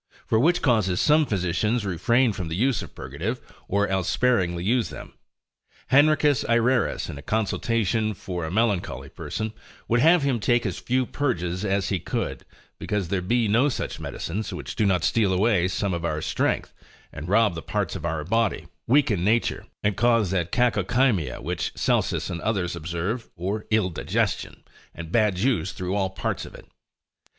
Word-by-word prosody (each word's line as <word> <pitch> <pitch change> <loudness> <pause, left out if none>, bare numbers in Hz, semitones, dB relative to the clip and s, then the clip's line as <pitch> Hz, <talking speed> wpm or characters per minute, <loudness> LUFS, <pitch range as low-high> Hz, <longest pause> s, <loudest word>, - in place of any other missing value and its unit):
For 110 - +2
which 170 +7 +3
causes 105 -8 +2
some 150 0 +4
physicians 105 +4 0
refrain 115 +7 +2
from 90 -4 -4
the 80 - -3
use 125 +4 +1
of - - -10
purgatives, 85 - -4 0.3
or 100 +1 +1
else 95 -2 -1
sparingly 90 -9 +1
use 115 +3 +1
them. - - -10 0.8
Henricus 145 -1 +4
Ayrerus 120 +1 +2
in 70 - -7
a - - -8
consultation 110 +1 0
for 90 -2 -5
a 80 - -3
melancholy 90 - -1
person, 110 +8 -5 0.3
would 120 - +2
have 165 +4 +5
him 135 -4 +1
take 120 +2 +2
as 95 -4 -2
few 130 +1 0
purges 95 -11 -2
as 100 -2 0
he 95 - 0
could, - - -4 0.3
because 100 -5 -2
there 95 -1 0
be 115 +5 +1
no 120 +8 +3
such - - -4
medicines, 105 +6 -4
which - - -6
do 110 - +2
not 90 -4 +2
steal 105 -2 +2
away 95 -1 +2
some 95 +1 -1
of 85 -1 -3
our 75 -2 -1
strength, - - -1 0.4
and 75 +5 -7
rob 105 -1 +4
the 80 - -5
parts - - -2
of - - -6
our 80 -1 -2
body, 115 +5 0 0.2
weaken 115 -9 +3
nature, 115 +4 +1 0.2
and 105 -2 +1
cause 115 -5 +3
that 85 -3 -1
cacochymia, 120 - +1
which 85 +3 -3
Celsus - - 0
and 85 -1 -4
others 95 -6 -1
observe, 85 +8 -3
or 100 +5 -3
ill 110 -4 +2
digestion, 80 - -2 0.3
and 80 0 -8
bad 105 -3 +3
juice 95 -4 0
through 90 +1 -3
all 100 -2 0
the 95 - -16
parts - - -2
of - - -10
it. - - -13
105 Hz, 175 wpm, -25 LUFS, 90-120 Hz, 0.8 s, have